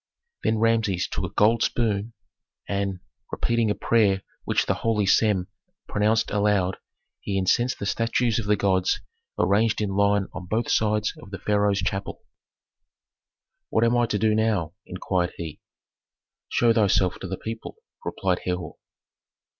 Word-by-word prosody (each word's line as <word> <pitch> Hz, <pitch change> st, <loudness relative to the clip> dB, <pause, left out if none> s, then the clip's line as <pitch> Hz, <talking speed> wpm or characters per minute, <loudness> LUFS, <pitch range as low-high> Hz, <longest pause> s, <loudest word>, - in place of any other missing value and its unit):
Then 110 Hz, -, +2 dB
Rameses 110 Hz, -5 st, +1 dB
took -, -, -3 dB
a -, -, -4 dB
gold 110 Hz, +2 st, +4 dB
spoon, 110 Hz, -1 st, 0 dB, 0.5 s
and, 100 Hz, -2 st, -2 dB, 0.3 s
repeating 115 Hz, -2 st, +1 dB
a 105 Hz, -, +1 dB
prayer 100 Hz, -5 st, +2 dB, 0.2 s
which -, -, +1 dB
the -, -, +1 dB
holy 110 Hz, -3 st, 0 dB
Sem 95 Hz, -2 st, +3 dB, 0.4 s
pronounced 110 Hz, +2 st, +1 dB
aloud, 100 Hz, -3 st, +1 dB, 0.4 s
he 100 Hz, -, -3 dB
incensed 120 Hz, +7 st, +1 dB
the -, -, -5 dB
statues 115 Hz, +2 st, +1 dB
of 105 Hz, -, -4 dB
the 105 Hz, -, +4 dB
gods 95 Hz, -2 st, +1 dB, 0.4 s
arranged 105 Hz, +3 st, +2 dB
in 105 Hz, -2 st, -1 dB
line 100 Hz, 0 st, +2 dB
on 90 Hz, -, -7 dB
both 110 Hz, +4 st, -1 dB
sides 105 Hz, -1 st, +1 dB
of -, -, -12 dB
the 95 Hz, -, -6 dB
pharaoh's 100 Hz, 0 st, +1 dB
chapel. 100 Hz, 0 st, -3 dB, 1.5 s
"What 110 Hz, -, +2 dB
am 115 Hz, +1 st, +3 dB
I 120 Hz, -1 st, +3 dB
to 105 Hz, -, 0 dB
do 110 Hz, +1 st, +2 dB
now?" 105 Hz, -7 st, 0 dB
inquired 90 Hz, -1 st, -1 dB
he. 80 Hz, -3 st, -7 dB, 0.9 s
"Show 115 Hz, -1 st, +3 dB
thyself 100 Hz, -4 st, +2 dB
to -, -, -6 dB
the -, -, -4 dB
people," 115 Hz, 0 st, -7 dB, 0.3 s
replied 95 Hz, -2 st, -1 dB
Herhor. 90 Hz, -3 st, -3 dB
105 Hz, 145 wpm, -25 LUFS, 95-110 Hz, 1.5 s, gold